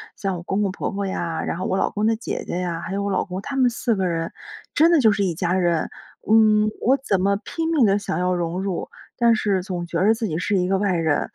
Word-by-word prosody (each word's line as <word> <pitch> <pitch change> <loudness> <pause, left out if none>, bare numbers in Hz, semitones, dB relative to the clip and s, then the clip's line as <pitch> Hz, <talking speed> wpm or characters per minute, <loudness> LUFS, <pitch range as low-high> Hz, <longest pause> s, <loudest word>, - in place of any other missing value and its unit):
像 195 -2 -2
我 170 - -8
公 195 +3 -1
公 200 -2 0
婆 195 - -4
婆 200 0 -3
呀， 170 -4 -3
然 - - -3
后 185 - -3
我 190 - 0
老 - - +1
公 210 +1 -2
的 225 0 +3
姐 220 - -5
姐 175 - -2
呀， 170 -2 -3
还 185 - -5
有 200 0 -1
我 200 - -1
老 190 - +1
公 185 0 -5
他 275 - -6
们 260 -2 +4
4 235 -1 -1
个 190 -1 0
人， 165 -1 -2 0.4
真 325 +3 +5
的 335 - +5
就 225 -5 +5
是 200 0 0
一 185 -3 0
家 175 +1 -1
人。 175 -3 +1 0.4
嗯， 215 -1 +5
我 260 +4 +4
怎 205 -9 0
么 200 +1 +2
拼 325 -1 -3
命 305 -7 +4
地 200 0 +3
想 200 -5 -3
要 180 +1 +1
融 175 +1 -2
入， 195 -3 -3 0.3
但 235 -2 +4
是 200 -4 0
总 180 -2 -4
觉 170 0 -2
着 220 - +5
自 225 0 -3
己 160 -6 -2
是 200 +4 0
一 180 -1 +1
个 195 - +2
外 195 -1 +1
人， 160 -3 0
195 Hz, 290 characters per minute, -22 LUFS, 180-215 Hz, 0.4 s, 真